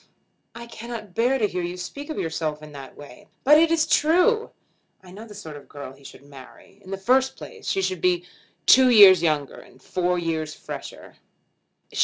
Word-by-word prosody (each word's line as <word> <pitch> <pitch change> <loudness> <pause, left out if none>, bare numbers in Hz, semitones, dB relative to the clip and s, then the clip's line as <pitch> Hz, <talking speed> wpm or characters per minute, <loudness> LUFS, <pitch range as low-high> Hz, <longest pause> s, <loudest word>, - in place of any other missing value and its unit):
"I 235 0 -8
cannot 230 -4 -9
bear 245 +6 +1
to 215 -5 +1
hear 180 - -4
you 175 +1 -5
speak 285 - -8
of 310 - -5
yourself 155 -2 -3
in 155 - -11
that 140 -2 -11
way." 145 -4 -14 0.2
"But 300 +3 +6
it 330 0 +4
is 325 -1 +2
true. 365 +11 +2 0.5
I 180 - -14
know 215 +5 -11
the 210 - -12
sort 160 -7 -9
of 145 - -13
girl 140 -2 -9
he 140 - -20
should 135 - -13
marry. 140 +7 -16
In 185 - -14
the 195 - -4
first 260 +7 +1
place 460 -3 -11
she 195 - 0
should 185 -3 -2
be 180 -1 +1 0.4
two 260 0 +6
years 200 -7 +8
younger, 150 -4 -1
and 130 - -18
four 180 +5 -1
years 160 -2 -3
fresher. - - -10
185 Hz, 195 wpm, -23 LUFS, 155-245 Hz, 0.5 s, years